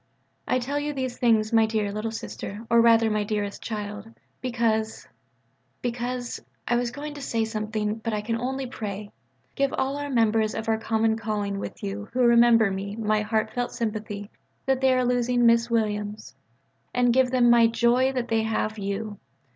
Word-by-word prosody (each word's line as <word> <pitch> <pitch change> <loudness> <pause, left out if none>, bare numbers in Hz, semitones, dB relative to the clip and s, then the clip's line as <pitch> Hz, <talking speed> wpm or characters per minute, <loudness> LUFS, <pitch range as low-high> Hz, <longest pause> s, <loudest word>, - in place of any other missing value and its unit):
I - - +2
tell 270 +4 -2
you 295 0 -2
these 260 -3 -4
things, 225 -2 +3
my 225 -1 +5
dear 215 -2 -1
"Little 215 +2 -3
Sister," 220 -1 -7
or 235 0 +6
rather 230 -1 +5
my 210 0 +1
dearest 205 -1 -3
child, 210 -1 -5 0.3
because 225 -3 -1 0.8
because 245 0 -3 0.3
I 240 - +2
was 240 0 0
going 290 +4 -7
to 290 - -9
say 230 -4 0
something, 215 -1 -2
but 225 +1 -3
I 210 -1 -1
can 225 +2 -2
only 260 +3 -2
pray.... 210 -4 -6 0.4
Give 275 -1 +1
all 270 +2 -1
our 290 0 -4
members 225 -3 +2
of 220 0 -4
our 220 -1 +1
common 220 0 +1
calling 205 -2 -2
with - - -7
you 205 +1 -5
who 255 - +1
remember 235 -3 +5
me 195 +1 -4
my 215 -1 +1
heart 215 0 -1
felt 245 0 -2
sympathy 215 -3 -4 0.3
that 265 -1 +1
they 265 0 +4
are 255 0 +2
losing 245 0 +2
Miss 230 0 +4
Williams: 210 -2 -2 0.6
and 245 -1 +3
give 260 0 +4
them 245 -2 +4 0.2
joy 245 +3 +3
that 250 -2 -2
they 225 0 +2
have 220 -1 -1
you. 200 +1 -4
225 Hz, 180 wpm, -25 LUFS, 215-245 Hz, 0.8 s, or